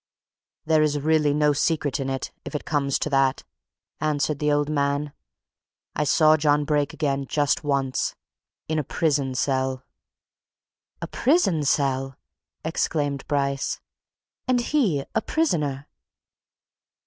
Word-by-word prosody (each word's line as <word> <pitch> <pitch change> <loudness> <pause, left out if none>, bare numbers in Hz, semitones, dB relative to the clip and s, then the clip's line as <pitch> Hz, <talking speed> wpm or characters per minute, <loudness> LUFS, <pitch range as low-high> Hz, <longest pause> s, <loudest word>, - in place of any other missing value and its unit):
"There 155 -1 +3
is 150 -1 +2
really 150 0 +2
no 150 0 +3
secret 145 -1 0
in 135 -1 -2
it 135 -1 -3
if - - -7
it 150 - -3
comes 140 -3 0
to - - -2
that," 135 -1 +2 0.6
answered 150 -1 0
the 150 0 +1
old 145 0 +2
man. 145 -1 -1 0.8
"I 150 - 0
saw 155 +2 +5
John 150 -1 +2
Brake 145 -1 +1
again 140 -2 -2
just 145 +1 +1
once. 140 -3 -1 0.5
In 155 0 0
a - - -1
prison 140 -3 0
cell!" 130 0 0 1.2
"A - - -3
prison 250 - +2
cell!" 135 -1 0 0.5
exclaimed 145 -3 -1
Bryce. 140 -1 -1 0.7
"And 250 -1 +3
he 220 - +1
a - - +1
prisoner?" 150 - -1
145 Hz, 125 wpm, -24 LUFS, 140-155 Hz, 1.2 s, saw